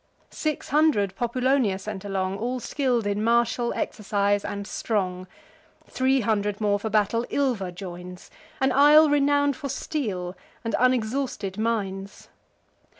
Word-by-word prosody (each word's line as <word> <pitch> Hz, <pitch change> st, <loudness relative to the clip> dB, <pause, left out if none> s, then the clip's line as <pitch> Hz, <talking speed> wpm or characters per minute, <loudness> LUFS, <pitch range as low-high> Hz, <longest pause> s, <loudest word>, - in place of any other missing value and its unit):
Six 310 Hz, -2 st, -3 dB
hundred 265 Hz, -10 st, +2 dB
Populonia 245 Hz, -2 st, +1 dB
sent 200 Hz, 0 st, -6 dB
along, 195 Hz, -1 st, -2 dB
All 250 Hz, +3 st, -2 dB
skill'd 250 Hz, -4 st, 0 dB
in 205 Hz, +1 st, -1 dB
martial 235 Hz, +1 st, +2 dB
exercise, 205 Hz, -1 st, 0 dB
and 200 Hz, 0 st, -4 dB
strong. 185 Hz, -4 st, -2 dB, 0.6 s
Three 265 Hz, 0 st, +1 dB
hundred 210 Hz, -2 st, 0 dB
more 205 Hz, -1 st, +1 dB
for 220 Hz, -, -3 dB
battle 215 Hz, +2 st, +1 dB
Ilva 245 Hz, -10 st, 0 dB
joins, 180 Hz, 0 st, -9 dB, 0.3 s
An 265 Hz, 0 st, +2 dB
isle 295 Hz, +3 st, +6 dB
renown'd 285 Hz, -1 st, +3 dB
for 285 Hz, -3 st, -6 dB
steel, 205 Hz, -, -3 dB, 0.3 s
and 230 Hz, -, -3 dB
unexhausted 240 Hz, -4 st, 0 dB
mines. 200 Hz, -3 st, -3 dB
220 Hz, 125 wpm, -25 LUFS, 200-260 Hz, 0.6 s, isle